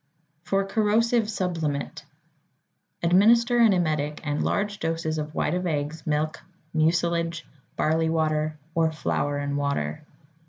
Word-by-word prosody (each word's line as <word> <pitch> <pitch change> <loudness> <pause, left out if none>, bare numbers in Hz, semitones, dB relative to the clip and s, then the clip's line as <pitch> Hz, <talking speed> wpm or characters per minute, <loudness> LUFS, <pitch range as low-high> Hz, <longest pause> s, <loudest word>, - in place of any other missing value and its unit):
=For 195 +3 0
Corrosive 220 +2 +2
Sublimate.= 165 -8 -3 1.0
Administer 230 +7 +4
an 230 -2 +6
emetic 155 -5 0
and 150 -1 -1
large 205 0 -1
doses 160 -1 -2
of 150 0 -5
white - - 0
of 180 0 -1
eggs, 150 0 -3
milk, 155 +1 0 0.3
mucilage, 170 +1 +1 0.3
barley 160 +1 +1
water, 155 -1 0 0.2
or 160 -1 +2
flour 145 -2 -1
and 145 0 -2
water. 140 - -2
160 Hz, 120 wpm, -25 LUFS, 150-190 Hz, 1.0 s, an